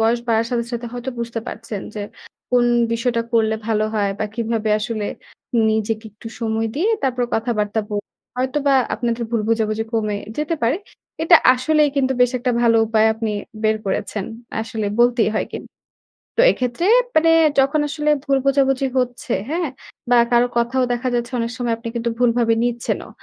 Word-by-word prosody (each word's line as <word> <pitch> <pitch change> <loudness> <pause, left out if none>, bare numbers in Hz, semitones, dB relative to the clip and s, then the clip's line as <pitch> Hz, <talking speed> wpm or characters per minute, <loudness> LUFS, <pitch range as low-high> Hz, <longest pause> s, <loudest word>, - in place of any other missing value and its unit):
বয়স 230 +2 +3
বাড়ার 225 0 +2
সাথে, 235 -1 0
সাথে 235 0 -3
হয়তো 245 +2 -4
বুঝতে 235 -1 -3
পারছেন। 220 -3 -6
যে 210 - -4 0.5
কোন 245 -1 +4 0.3
বিষয়টা 230 0 0
করলে 220 -1 +3
ভালো 215 -1 +1
হয় 205 -2 +1
বা 215 - 0
কিভাবে 225 -1 -1
আসলে 215 -1 -3 0.6
নিজেকে 220 +1 -1
একটু 225 +2 -10
সময় 225 0 0
দিয়ে 345 +9 +1
তারপর 250 -2 0
কথাবার্তা 220 -2 0
বলেন। 205 -1 -4 0.3
হয়তোবা 275 +2 +1 0.2
আপনাদের 235 0 -2
ভুল 230 - +1
বোঝাবুঝি 220 -1 0
কমে 215 -2 0 0.2
যেতে 305 +2 -1
পারে। 240 +7 +2 0.5
এটা 335 +1 +8 0.2
আসলেই 300 +4 +2
কিন্তু 265 -1 +2
বেশ 250 -1 +5
একটা 250 +1 0
ভালো 230 -1 +4
উপায় 220 0 +3
আপনি 220 -1 -2 0.3
বের 215 0 +2
করেছেন। 195 +1 -2 0.4
আসলে 220 -1 -3
বলতেই 240 -1 +4
হয় - - 0
কিন্তু। - - -7 0.7
তো - - +6
এক্ষেত্রে 250 +7 -2 0.3
মানে 325 +1 +5 0.3
যখন 275 +3 +3
আসলে 300 +1 -1 0.2
ভুল 275 -1 +2
বোঝাবুঝি 270 -1 +2
হচ্ছে 245 -1 -1 0.2
হ্যাঁ? 335 -1 -1 0.4
বা 245 - +5
কারো 240 +1 +4
কথাও 240 +2 +1
দেখা 245 +2 -2
যাচ্ছে 240 +1 -2
অনেক 230 0 -2
সময় 240 -2 -1
আপনি 230 0 -8
কিন্তু 235 0 -1
ভুলভাবে 235 -1 +3
নিচ্ছেনও। 240 -1 -2
235 Hz, 165 wpm, -20 LUFS, 225-255 Hz, 0.7 s, এটা